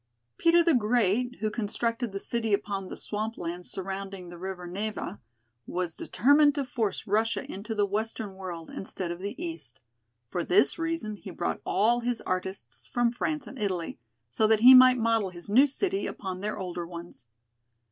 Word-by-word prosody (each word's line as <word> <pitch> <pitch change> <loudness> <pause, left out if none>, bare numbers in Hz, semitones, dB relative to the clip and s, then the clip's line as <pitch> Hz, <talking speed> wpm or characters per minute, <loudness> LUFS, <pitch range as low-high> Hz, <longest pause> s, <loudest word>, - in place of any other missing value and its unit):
Peter 335 0 +5
the 335 -1 +4
Great, 240 0 +2
who 215 -1 0
constructed 230 +2 -2
the 195 - -4
city 225 -1 +1
upon 200 -2 -4
the - - -7
swamp 215 +2 -3
lands 175 +1 -5
surrounding 195 -1 -5
the 175 - -9
river 185 -1 -5
Neva, 200 +1 -4 0.5
was 175 -2 -3
determined 290 +3 +4
to 280 -2 -1
force 225 -7 -2
Russia 215 0 +1
into 215 +4 -6
the 205 -1 +3
western 210 0 -3
world 180 -4 -7
instead 185 -2 -5
of 175 - -5
the 200 +2 -5
east. 155 -8 -6 0.5
For 175 +8 -2
this 140 - +4
reason 325 -11 -2
he 195 - -10
brought 175 -1 -3
all 230 +4 +3
his 240 -1 -1
artists 185 +1 -4
from 240 -1 +1
France 295 +4 -2
and 265 - -10
Italy, 185 -9 -2 0.3
so 125 - +2
that 220 0 +3
he 255 +2 +10
might 255 0 +9
model 225 -4 +2
his 175 +2 -9
new 260 +7 +7
city 385 +7 -1
upon 185 -2 -5
their 210 +1 -3
older 175 -3 -4
ones. 170 -7 -10
205 Hz, 175 wpm, -28 LUFS, 185-235 Hz, 0.5 s, he